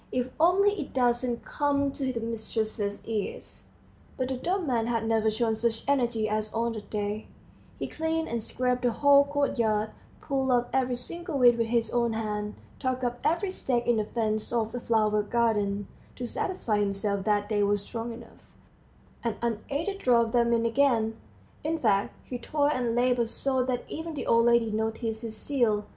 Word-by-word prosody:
If 250 0 -1
only 370 +5 +5
it 285 - -8
doesn't 245 -1 +1
come 280 -1 +1
to 270 -1 -2
the 235 - -3
mistress's 220 -2 -3
ears!" 220 -3 -4 0.5
But 255 0 -1
the 265 - -1
dumb 365 +7 -1
man 235 -5 0
had 230 -2 0
never 220 -1 +2
shown 225 +1 0
such 225 0 -1
energy 240 -6 +1
as 215 0 -1
on 230 +1 0
that 215 -2 -8
day; 210 0 -3 0.5
he - - -3
cleaned 320 0 -2
and 235 0 -2
scraped 250 +2 -1
the 245 - +2
whole 280 +3 +6
courtyard, 230 -7 0 0.3
pulled 270 -2 -1
up 245 -1 +2
every 255 -1 +1
single 335 +5 -3
weed 245 -2 +6
with 230 -1 0
his 230 0 +1
own 235 -1 +1
hand, 210 -1 -3 0.2
tugged 255 -1 -1
up 245 0 -1
every 345 +4 +1
stake 245 -9 -1
in 240 -1 +3
the 215 - +1
fence 215 -1 -1
of 225 -2 0
the 245 - -4
flower 215 -2 +2
garden, 205 -2 0 0.3
to 250 - -4
satisfy 235 - -1
himself 200 0 0
that 205 -1 +2
they 210 -2 +1
were 205 0 +3
strong 230 +3 -5
enough, 230 0 -13 0.7
and 230 -3 -1
unaided 280 - -2
drove 235 - +3
them 235 -1 +3
in 230 0 +2
again; 230 -3 +2 0.5
in 320 +2 0
fact, 205 -8 +1
he 245 - -6
toiled 290 +4 +1
and 240 -3 -1
labored 245 -1 +2
so 260 +2 0
that 250 -1 -1
even 320 0 -5
the 280 - -4
old 230 0 +4
lady 235 -2 +4
noticed 220 +1 -2
his 225 -2 -6
zeal. 220 -6 +1
235 Hz, 180 wpm, -28 LUFS, 220-260 Hz, 0.7 s, whole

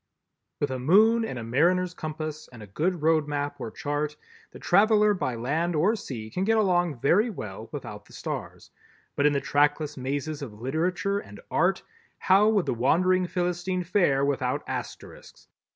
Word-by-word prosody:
With 145 - -1
a 130 - -3
moon 215 - +4
and 135 - -4
a 120 - -5
mariner's 175 +10 +2
compass 155 -1 -6
and 115 -4 -11
a - - -8
good 160 - -2
road 160 -1 +3
map 145 -1 -3
or 115 - -4
chart, 145 +4 -3 0.3
the - - -12
traveler 210 +2 +4
by 130 -10 -2
land 155 +9 -1
or 190 +9 +3
sea 115 - -7
can 180 - -2
get 225 +3 +2
along 175 - +1
very 210 - +3
well 110 - -7
without - - -7
the - - -19
stars, - - -6 0.4
but 145 - +3
in 145 - +2
the 140 - +1
trackless 145 +1 +1
mazes 145 +3 -3
of 110 -7 -8
literature 175 - -1
and - - -12
art, - - +1 0.3
how 195 +3 +4
would 205 -5 +2
the - - 0
wandering 180 +9 +2
Philistine 180 +1 -2
fare 170 -7 +2
without 130 -3 -1
Asterisks? - - -8
155 Hz, 170 wpm, -26 LUFS, 140-185 Hz, 0.4 s, moon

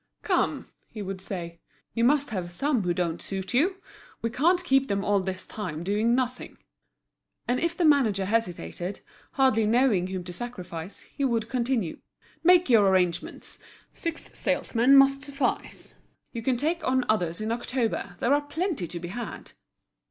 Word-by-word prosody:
"Come," - - 0 0.2
he 215 -3 -6
would 190 -1 -5
say, 170 -3 -6 0.3
"you 230 - 0
must 285 +1 +3
have 180 -4 -3
some 265 +6 +1
who 180 -2 0
don't 170 -1 -1
suit 190 -1 -4
you. 340 +10 +3 0.5
We 230 - 0
can't 345 +8 +3
keep 270 -5 +3
them 200 0 -1
all 205 -1 +3
this 185 0 -3
time 170 -7 -5
doing 210 +5 +2
nothing." 255 -1 -3 0.9
And 245 +1 +1
if 335 +1 -1
the 350 - +2
manager 235 -10 +4
hesitated, 185 - -2 0.3
hardly 260 -7 +3
knowing 225 -6 +3
whom 185 -1 -4
to 180 0 -7
sacrifice, 180 -5 -7
he 280 - -6
would 230 -4 0
continue; 240 -8 -1 0.4
"Make 360 +1 +6
your 220 -6 +5
arrangements, 180 -2 0 0.3
six 330 -1 -5
salesmen 250 +4 +3
must 275 0 +6
suffice; 280 -1 -2 0.3
you 230 - -4
can 250 +2 +1
take 320 +6 -1
on 255 -1 +1
others 175 -6 0
in 215 +1 -2
October, 235 -5 -2
there 245 +9 +2
are 290 - +3
plenty 295 - -2
to 170 - -6
be 175 0 -6
had!" 240 +6 -6
230 Hz, 160 wpm, -27 LUFS, 185-270 Hz, 0.9 s, Make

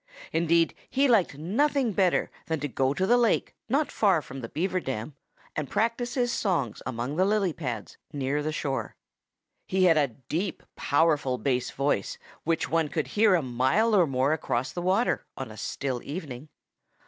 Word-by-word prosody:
Indeed, 165 0 +3 0.2
he 275 +1 +3
liked 205 - +3
nothing 250 - +1
better 185 -2 +2 0.2
than 160 -1 -1
to 145 - -1
go 130 +1 0
to 185 +6 0
the 245 +5 +4
lake 235 -2 +2 0.2
not 280 +5 +1
far 195 -6 +3
from 135 +1 -8
the 115 - -6
Beaver 185 +3 -1
dam 130 -3 -4 0.4
and 150 -3 -3
practice 235 +2 0
his 245 -2 +1
songs 145 - -1
among 130 +4 -3
the 185 - +4
lily 200 -3 +2
pads 125 -10 -5
near 145 0 -1
the 155 +1 -2
shore. 140 -3 -3 0.7
He 190 0 +2
had 165 -4 +5
a 145 - +3 0.2
deep, 175 +6 -2
powerful 145 -4 +2
bass 125 -2 0
voice, 140 -8 -1 0.3
which 165 0 0
one 165 -1 +1
could 150 -3 -2
hear 210 +3 +4
a 165 - +1
mile 130 - +2
or 180 -4 +5
more 135 +2 +1
across 130 -5 -1
the 175 - -4
water 190 +7 +1
on - - -5
a - - -10
still 130 -3 -3
evening. 145 -3 -7
160 Hz, 175 wpm, -27 LUFS, 135-195 Hz, 0.7 s, had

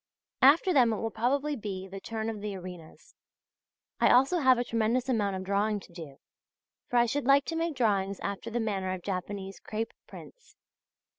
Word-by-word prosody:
After 310 +7 +6
them 245 -5 +5
it - - 0
will 225 +1 -3
probably 280 +7 0
be 195 -5 -6
the 195 +1 -8
turn 220 +2 -4
of 220 -2 -4
the 205 -1 -4
arenas. 180 -3 -11 0.9
I - - +4
also 270 +8 +4
have 260 -4 +5
a 245 - 0
tremendous 230 +2 0
amount 210 -6 0
of 190 - -4
drawing 205 +2 0
to 185 - -17
do; 155 -6 -10 0.7
for 245 - +1
I 240 - +5
should 280 +4 -2
like 275 +1 +5
to 330 - -3
make 330 -1 -1
drawings 200 -5 0
after 200 +3 -4
the 235 +1 -2
manner 195 -4 -2
of 185 -2 -7
Japanese 195 0 -5
crape 220 +1 -4 0.2
prints. - - -14
220 Hz, 190 wpm, -29 LUFS, 195-255 Hz, 0.9 s, After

